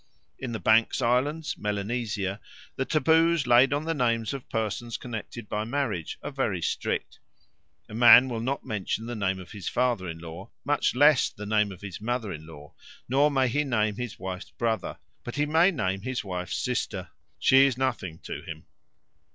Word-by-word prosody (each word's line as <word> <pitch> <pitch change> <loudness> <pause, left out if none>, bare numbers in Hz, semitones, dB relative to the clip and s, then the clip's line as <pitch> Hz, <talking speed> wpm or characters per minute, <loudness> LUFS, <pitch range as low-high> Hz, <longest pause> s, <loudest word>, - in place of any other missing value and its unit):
In 130 -3 -4
the 110 - -3
Banks' 110 +1 +3
Islands, 145 +7 0
Melanesia, 105 -1 -2 0.3
the 135 - -1
taboos 160 +1 +3
laid 125 +2 +5
on 145 +2 -1
the 165 - 0
names 115 -4 0
of 135 -2 -7
persons 115 +1 -2
connected 120 -2 -7
by 105 +1 -2
marriage 115 - -2
are - - -4
very 130 -9 -1
strict. - - -2 0.7
A - - -12
man 120 +2 +8
will 120 -3 -3
not 130 +5 -2
mention 110 +1 -3
the 120 +1 -5
name 95 -3 -1
of 90 - -11
his 100 -3 -5
father 120 -7 0
in 80 - -6
law, 85 +3 -9 0.2
much 145 -3 +1
less 145 +1 +5
the 105 - -9
name 105 -1 +2
of 95 - -11
his 100 -2 -7
mother 115 -3 -2
in 80 0 -9
law, 75 -2 -12 0.3
nor 140 +4 +4
may 135 -2 +2
he 145 +5 +1
name 110 -6 0
his 125 -3 -5
wife's 95 0 -6
brother; 115 -2 -2 0.3
but 120 - -6
he 145 +1 +1
may 160 +4 +4
name 95 - -1
his 130 +3 -3
wife's 90 -3 -4
sister - - -3 0.3
she 135 +1 +6
is 130 -3 -2
nothing 95 -11 -2
to - - -6
him. 80 -1 -9
115 Hz, 185 wpm, -27 LUFS, 100-135 Hz, 0.7 s, man